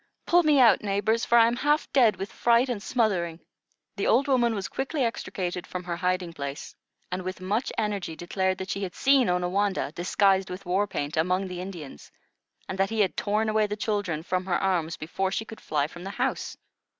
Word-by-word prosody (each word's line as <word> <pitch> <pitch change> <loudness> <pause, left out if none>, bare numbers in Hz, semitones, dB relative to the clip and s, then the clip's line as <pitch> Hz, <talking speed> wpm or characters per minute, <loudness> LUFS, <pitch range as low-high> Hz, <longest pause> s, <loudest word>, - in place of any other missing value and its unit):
Pull 350 +1 +5
me 305 -4 +4
out, 240 -3 +6
neighbors, 210 +3 0
for 235 - +4
I 230 - +8
am 235 +1 0
half 295 +4 +1
dead 240 -6 +5
with 195 +3 -6
fright 240 +2 +3
and 230 -5 -2
smothering." 190 -8 0 0.6
The 200 - 0
old 265 +5 +3
woman 240 -4 +2
was 195 -2 -3
quickly 270 +1 -2
extricated 185 -6 -3
from 180 0 -5
her 175 -1 -3
hiding 180 -1 -1
place, 140 -1 -6 0.4
and 180 +1 -2
with 185 +1 -5
much 205 +7 -1
energy 200 -6 -2
declared 185 +2 -1
that 190 +1 -5
she 200 - -3
had 185 -2 -4
seen 270 -5 +4
Onawandah, 180 -1 0
disguised 190 +2 +2
with 185 +2 -7
war 190 +3 +1
paint, 150 -4 -4
among 180 +4 +1
the 180 -1 -6
Indians, 170 - -9 0.6
and 190 - -5
that 195 0 +2
he 225 -1 0
had 190 - +1
torn 215 +2 0
away 215 -1 +2
the 205 - -3
children 205 -7 -2
from 185 +1 -1
her 175 - +2
arms 170 -4 0
before 190 +5 -2
she 225 - -2
could 220 - -11
fly 145 -2 0
from 175 +3 -9
the 195 - -5
house. 250 +6 -2
195 Hz, 205 wpm, -26 LUFS, 180-225 Hz, 0.6 s, I